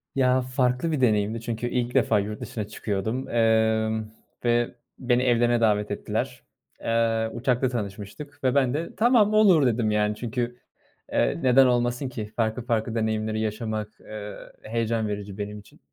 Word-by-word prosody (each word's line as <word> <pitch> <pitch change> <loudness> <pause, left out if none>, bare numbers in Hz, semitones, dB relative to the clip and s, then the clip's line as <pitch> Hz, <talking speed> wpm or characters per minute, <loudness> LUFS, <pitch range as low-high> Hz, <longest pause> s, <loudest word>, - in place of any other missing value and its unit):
Ya, 130 -1 +3
farklı 125 +4 0
bir 150 - -1
deneyimdi 110 -1 +2
çünkü 115 +1 -3
ilk 120 0 -1
defa 115 -5 +3
yurt 105 +1 -4
dışına 120 -5 -4
çıkıyordum, 110 +4 -3
emm, 110 -1 +2 0.4
ve 120 0 +1 0.2
beni 125 0 +2
evlerine 120 -1 +3
davet 105 -1 +2
ettiler. - - -3 0.4
Eee, 115 -1 +1
uçakta 125 +1 +1
tanışmıştık 120 +6 -6
ve 130 +1 +2
ben 130 -3 +3
de, 165 +3 -4
"Tamam, 220 -2 +4
olur," 195 -9 +6
dedim 115 -3 +1
yani 105 0 +1
çünkü, 120 +2 -3 0.5
eee, - - +1
neden 130 +1 +6
olmasın 125 +1 +1
ki 110 -4 -5
farklı 110 +1 0
farklı 115 -1 -1
deneyimleri 110 -1 -1
yaşamak, 110 0 -3
eee, 105 -1 -8 0.3
heyecan 115 0 -1
verici 100 -1 -5
benim 105 0 -5
için. 100 - -18
115 Hz, 150 wpm, -25 LUFS, 110-125 Hz, 0.5 s, olur